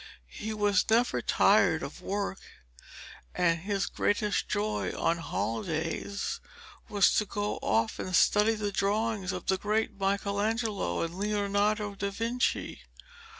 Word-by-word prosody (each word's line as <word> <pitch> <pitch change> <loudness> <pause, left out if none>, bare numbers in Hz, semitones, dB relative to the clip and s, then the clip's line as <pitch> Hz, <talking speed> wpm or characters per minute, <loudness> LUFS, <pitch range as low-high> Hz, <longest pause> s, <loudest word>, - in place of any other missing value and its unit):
He 220 - -5
was 205 -3 +2
never 235 +2 +3
tired - - +3
of - - -7
work, 200 -1 -3 1.0
and 170 -2 +2
his 195 +2 -1
greatest 205 0 0
joy 210 +1 -1
on 170 +1 +1
holidays 165 - -3 0.5
was 205 -2 +4
to 210 - +2
go 205 +1 -2
of 110 +2 0
and 185 - -2
study 210 +5 +4
the 210 -1 -2
drawings 200 -1 0
of 185 - -5
the 190 -1 +1
great 210 0 -1
Michelangelo 200 - 0
and 165 0 -4
Leonardo 205 0 0
da 200 0 -3
Vinci. 230 +5 -1
205 Hz, 125 wpm, -29 LUFS, 190-210 Hz, 1.0 s, was